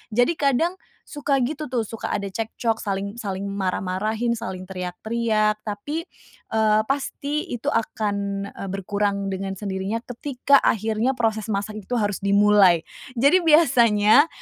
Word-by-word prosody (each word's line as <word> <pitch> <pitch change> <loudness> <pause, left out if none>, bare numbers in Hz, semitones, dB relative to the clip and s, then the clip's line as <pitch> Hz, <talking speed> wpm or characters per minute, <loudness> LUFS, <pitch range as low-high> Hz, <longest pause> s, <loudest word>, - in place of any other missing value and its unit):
Jadi 245 +6 +4
kadang 290 +5 +2 0.3
suka 285 -2 0
gitu 300 +4 -3
tuh, 235 -3 0
suka 225 - -5
ada 200 -1 -3
cekcok 225 +1 -2
saling 200 +1 -3
saling 195 -2 -4
marah-marahin, 200 +4 -1
saling 185 -4 -6
teriak-teriak, 215 +4 -1
tapi, 290 +11 -4 0.5
eee, 215 -1 +3
pasti 285 +4 -2
itu 240 - -5
akan, 215 -2 -1 0.4
eee, 195 - -7
berkurang 200 0 -1
dengan 195 0 -4
sendirinya 195 +2 -3
ketika 270 +2 +2
akhirnya 220 +4 +1
proses 220 -2 -1
masak 205 +2 -2
itu 230 +5 -4
harus 205 -4 0
dimulai. 200 -4 +5 0.3
Jadi 280 +10 +5
biasanya 255 -5 +5
215 Hz, 130 wpm, -23 LUFS, 200-245 Hz, 0.5 s, dimulai